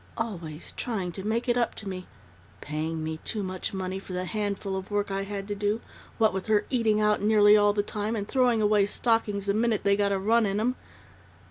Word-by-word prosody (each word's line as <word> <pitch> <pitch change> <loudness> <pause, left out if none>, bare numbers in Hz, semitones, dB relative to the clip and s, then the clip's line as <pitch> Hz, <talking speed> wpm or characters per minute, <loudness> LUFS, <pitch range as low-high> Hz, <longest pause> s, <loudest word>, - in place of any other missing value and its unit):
Always 170 -9 -5
trying 195 -7 -3
to 190 +2 -7
make 225 +4 -1
it 240 0 +2
up 240 -2 0
to 205 - -5
me 185 -1 -5 0.5
paying 155 +2 -3
me 160 0 -3
too 210 -2 -3
much 185 -1 -4
money 190 0 -3
for 195 - -9
the 180 0 -2
handful 200 -1 -2
of 190 0 -5
work 205 -1 -1
I 195 0 -1
had 200 -1 -5
to - - 0
do, 205 +2 0 0.4
what 220 -2 +3
with 190 +2 -4
her 215 -1 +3
eating 225 -4 +2
out 210 0 +2
nearly 210 0 +6
all 205 -1 +5
the 205 0 0
time 210 +2 -3
and 205 -2 -3
throwing 245 -4 +2
away 210 -1 +4
stockings 210 -3 +1
the 200 - +1
minute 225 0 +1
they 200 0 +4
got 200 0 +1
a 195 - +2
run 220 +3 +3
in 200 +1 0
'em 245 +4 +1
205 Hz, 225 wpm, -27 LUFS, 190-220 Hz, 0.5 s, nearly